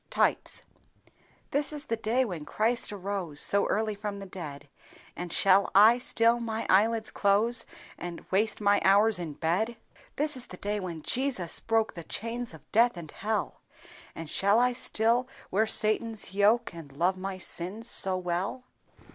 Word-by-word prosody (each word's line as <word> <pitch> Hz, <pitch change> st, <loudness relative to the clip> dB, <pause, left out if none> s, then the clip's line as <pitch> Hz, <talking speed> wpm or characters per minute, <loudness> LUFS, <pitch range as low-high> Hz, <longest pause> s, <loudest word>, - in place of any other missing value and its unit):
Types. -, -, +1 dB, 0.9 s
"This 290 Hz, +2 st, 0 dB
is 295 Hz, -1 st, -3 dB
the 230 Hz, -, -1 dB
day 230 Hz, +4 st, 0 dB
when 175 Hz, -8 st, -6 dB
Christ 225 Hz, +10 st, 0 dB
arose, 190 Hz, -6 st, -5 dB
So 200 Hz, 0 st, +3 dB
early 215 Hz, 0 st, -1 dB
from 205 Hz, 0 st, -6 dB
the 200 Hz, -, -8 dB
dead; 150 Hz, -6 st, -9 dB, 0.5 s
And 175 Hz, -1 st, -6 dB
shall 195 Hz, +2 st, +3 dB
I 220 Hz, +5 st, +7 dB
still 235 Hz, -1 st, +2 dB
my 225 Hz, -1 st, -4 dB
eyelids 220 Hz, +3 st, +2 dB
close 215 Hz, +4 st, +2 dB, 0.3 s
And 175 Hz, -1 st, -7 dB
waste 215 Hz, +3 st, +1 dB
my 205 Hz, -1 st, +2 dB
hours 200 Hz, +1 st, +5 dB
in 165 Hz, -4 st, -5 dB
bed! 190 Hz, +10 st, -1 dB, 0.4 s
"This 300 Hz, 0 st, +1 dB
is 250 Hz, -1 st, -4 dB
the 180 Hz, -, -10 dB
day 205 Hz, +2 st, -2 dB
when 170 Hz, -5 st, -6 dB
Jesus 245 Hz, -11 st, -1 dB
broke 225 Hz, -1 st, 0 dB
The 170 Hz, -, -8 dB
chains 230 Hz, +7 st, -4 dB
of 155 Hz, -, -19 dB
death 235 Hz, -2 st, +3 dB
and 160 Hz, -3 st, -8 dB
hell; 215 Hz, +1 st, -3 dB, 0.5 s
And 165 Hz, -, -7 dB
shall 200 Hz, +7 st, +2 dB
I 250 Hz, +1 st, +3 dB
still 240 Hz, +1 st, +1 dB, 0.2 s
wear 215 Hz, +4 st, +1 dB
Satan's 215 Hz, -2 st, +1 dB
yoke 205 Hz, +3 st, +2 dB
And 165 Hz, -4 st, -11 dB
love 180 Hz, +4 st, +1 dB
my 190 Hz, 0 st, -5 dB
sins 185 Hz, +5 st, -3 dB
so 190 Hz, -4 st, +6 dB
well!" 180 Hz, +7 st, -3 dB
205 Hz, 165 wpm, -28 LUFS, 185-230 Hz, 0.9 s, I